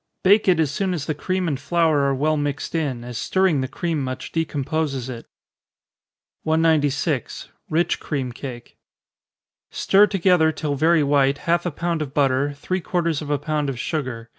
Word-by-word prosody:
Bake 205 +3 +5
it 180 -3 +4
as 155 -4 +2
soon 185 +4 -1
as 145 -5 -4
the 155 - -1
cream 185 +4 -2
and 140 -5 -1
flour 160 +1 +2
are 140 0 +1
well 155 +3 +1
mixed 145 -1 -3
in, 140 -7 -2
as 120 -1 -6
stirring 185 -7 +2
the 130 - -2
cream 160 +1 -2
much 130 0 -5
decomposes 150 -4 -2
it. 115 -2 -8 1.1
196. 155 -4 0 0.2
Rich 165 +3 +1
Cream 135 -5 -3
Cake. 120 -1 -9 0.9
Stir 205 +2 +4
together, 180 -4 +3
till 150 -1 -3
very 160 +3 +3
white, 140 -1 +2
half 170 +1 +1
a - - -2
pound 165 +2 -2
of 140 -2 -5
butter, 140 0 +2
three 185 +6 -3
quarters 170 -4 -1
of 150 - -7
a 145 - +1
pound 150 0 -2
of 130 - -4
sugar. 120 -4 -4
150 Hz, 170 wpm, -22 LUFS, 135-165 Hz, 1.1 s, Bake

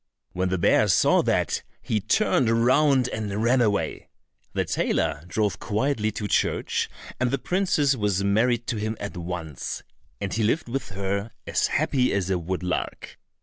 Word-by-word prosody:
When 90 +1 -1
the 95 - 0
bear 85 - +4
saw - - +4
that, - - 0 0.2
he 110 - -1
turned 120 - +2
round 130 +3 +4
and 105 -1 -3
ran 125 +2 +4
away. 105 -3 0 0.4
The - - 0
tailor 75 +1 0
drove 105 +1 -1
quietly 110 0 0
to 105 - -3
church, - - 0 0.3
and 125 0 +2
the 135 - 0
princess 155 -4 +1
was 100 -4 0
married 115 +4 +2
to 120 - -1
him 110 +1 -2
at 100 - -5
once, 85 -4 -5 0.4
and 95 - -3
he 115 - 0
lived 115 +9 +1
with 135 +2 -3
her 100 +2 -3
as - - +1
happy 125 -2 +1
as 95 -1 0
a 90 - +1
woodlark. 90 +1 -3
110 Hz, 160 wpm, -25 LUFS, 95-125 Hz, 0.4 s, bear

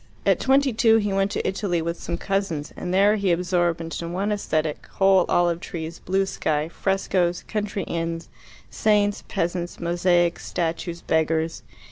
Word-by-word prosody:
At - - +3
twenty 270 0 +3
two 225 0 +5
he 205 -2 0
went 195 0 +2
to - - -2
Italy 190 -3 -1
with 170 +1 -3
some 170 - -3
cousins, 195 -6 -2
and 180 - -4
there 200 +3 +4
he 200 -3 +1
absorbed 175 -1 +1
into 165 0 -5
one 195 +4 -1
aesthetic 155 -7 -1
whole 190 -2 +4
olive 175 -1 +2
trees, 165 -1 -6
blue 195 +2 0
sky, 155 -5 -1
frescoes, 185 -2 0
country 205 -2 -2
inns, 165 0 -3 0.4
saints, 205 -1 +2
peasants, 175 -2 -2
mosaics, 175 0 +1
statues, 170 0 -3
beggars. 160 0 0
175 Hz, 150 wpm, -24 LUFS, 170-195 Hz, 0.4 s, two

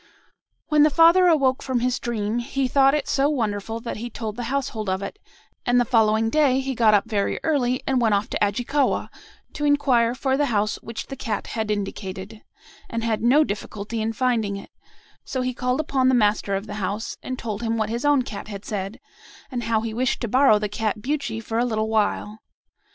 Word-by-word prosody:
"When 300 -1 +4
the 305 - +6
father 335 +5 +6
awoke 275 -6 +3
from 255 -3 -1
his 250 0 0
dream, 225 -1 -2
he 260 +2 -1
thought 275 +2 +4
it 295 - -2
so 275 +1 +2
wonderful, 225 -5 -2
that 235 - -5
he 235 +3 -5
told 220 -2 -5
the 240 0 -4
household 250 -7 -2
of 190 +1 -1
it; 410 - -7 0.4
and 245 0 +3
the 245 - +3
following 225 -1 +3
day 275 -3 +3
he 270 0 -2
got 225 -3 +4
up 205 +2 +1
very 205 -3 -1
early 255 -5 +1
and 265 -2 +1
went 220 -3 +3
off 200 +2 -1
to - - 0
Ajikawa, 245 +7 0 0.4
to 295 - -5
inquire 265 -5 +3
for 265 +1 0
the 290 0 +2
house 215 -3 0
which 230 0 -7
the 270 - -7
cat 225 -6 -3
had 220 -2 -2
indicated, 200 0 -4 0.5
and 230 0 -3
had 225 -2 0
no 260 +7 +5
difficulty 210 -1 -4
in 220 +1 -1
finding 225 -4 0
it; 200 - -11 0.5
so 260 - -3
he 255 0 -1
called 250 +3 -1
upon 270 -4 +1
the 260 - +4
master 210 -3 +2
of 195 +2 -3
the 205 - -7
house, 200 +4 -3
and 255 - -5
told 215 -3 -4
him 230 -1 -1
what 220 -1 -1
his 235 +1 -3
own 290 -3 +3
cat 210 -4 -7
had 200 -1 -8
said, 200 +1 -4 0.5
and 240 -3 -3
how 225 -1 +1
he 225 -1 -4
wished 250 +2 0
to 235 - -1
borrow 255 -1 +5
the 210 0 -2
cat 210 +1 -2
Buchi 265 -2 -2
for 225 0 -3
a - - +3
little 220 -2 -1
while. 215 0 0
230 Hz, 210 wpm, -23 LUFS, 215-260 Hz, 0.5 s, the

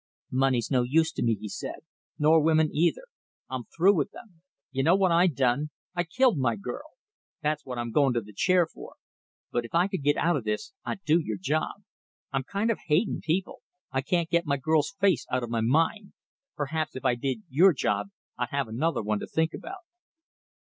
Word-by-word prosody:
"Money's 130 -2 +1
no 130 -2 +4
use 160 +6 +2
to - - -5
me," 115 -1 +2
he 105 - -6
said, - - -6 0.4
"nor 155 +1 +5
women 155 0 +3
either 170 - +1 0.5
I'm 130 -2 -4
through 185 +5 +3
with 155 -7 0
them. 180 -8 -15 0.3
You 135 0 -1
know 165 +7 +5
what 190 -2 +3
I 170 +2 +5
done? 140 -1 +1 0.2
I 175 0 -1
killed 245 - +2
my 120 -3 +1
girl. 115 +4 -6 0.6
That's 150 0 0
what 125 -1 -5
I'm 120 -1 -3
going 140 0 +3
to 120 - +1
the 105 0 -13
chair 180 - +3
for. 160 - -12 0.6
But 120 - 0
if 115 - -7
I 175 +3 +4
could 190 -5 -4
get 145 +1 +2
out 175 +1 +2
of 135 - -2
this, 105 - -3
I'd 195 - -5
do 160 +3 +4
your 110 -10 -3
job. 155 - -2 0.5
I'm 135 -1 0
kind 200 - 0
of 225 - -3
hating 165 +8 +1
people. 180 +4 -2 0.3
I 130 - 0
can't 170 +4 0
get 170 -1 +2
my 140 -1 +1
girl's 155 +4 +1
face 190 -10 +2
out 125 0 0
of 115 - -5
my 115 -1 0
mind. 165 - +1 0.4
Perhaps 155 +2 -2
if 130 - -7
I 125 - +4
did 135 - -3
your 170 +7 +5
job 150 +5 -1 0.3
I'd 125 - -1
have 140 -3 -1
another 130 +5 -1
one 105 0 0
to - - -6
think 160 0 0
about." 385 0 -8
150 Hz, 205 wpm, -27 LUFS, 125-170 Hz, 0.6 s, nor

